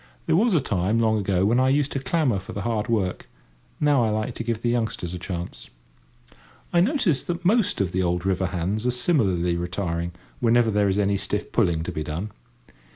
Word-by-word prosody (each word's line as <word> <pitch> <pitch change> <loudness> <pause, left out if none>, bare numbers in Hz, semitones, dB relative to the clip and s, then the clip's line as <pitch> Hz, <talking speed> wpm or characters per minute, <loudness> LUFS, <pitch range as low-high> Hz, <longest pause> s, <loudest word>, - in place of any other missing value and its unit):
There 160 - +2
was 215 +2 +3
a - - +5
time, 105 -4 0
long 110 -1 +2
ago, 95 -2 +1
when 115 +4 +3
I 130 0 +3
used 145 +1 +1
to 135 - -1
clamour 135 - +1
for 95 - -9
the 100 - -4
hard 115 -2 -1
work: 100 -6 -1 0.5
now 145 -4 +3
I 110 - +2
like 110 +3 -2
to 115 - -5
give 115 -1 -3
the 120 - +1
youngsters 110 -7 -2
a 90 - -5
chance. 85 -1 -6 1.0
I 170 - +5
notice 195 - +2
that 175 0 -5
most 205 +1 +3
of 95 -3 0
the 95 - 0
old 90 0 -1
river 95 -1 +1
hands 95 +6 -2
are 125 0 0
similarly 95 - +1
retiring, 85 -1 -3 0.3
whenever 120 -1 +3
there 105 -1 +2
is 95 - 0
any 100 -1 +2
stiff 100 +1 -3
pulling 85 -8 +1
to - - -4
be 75 - -3
done. 85 +8 -4
105 Hz, 210 wpm, -24 LUFS, 90-125 Hz, 1.0 s, a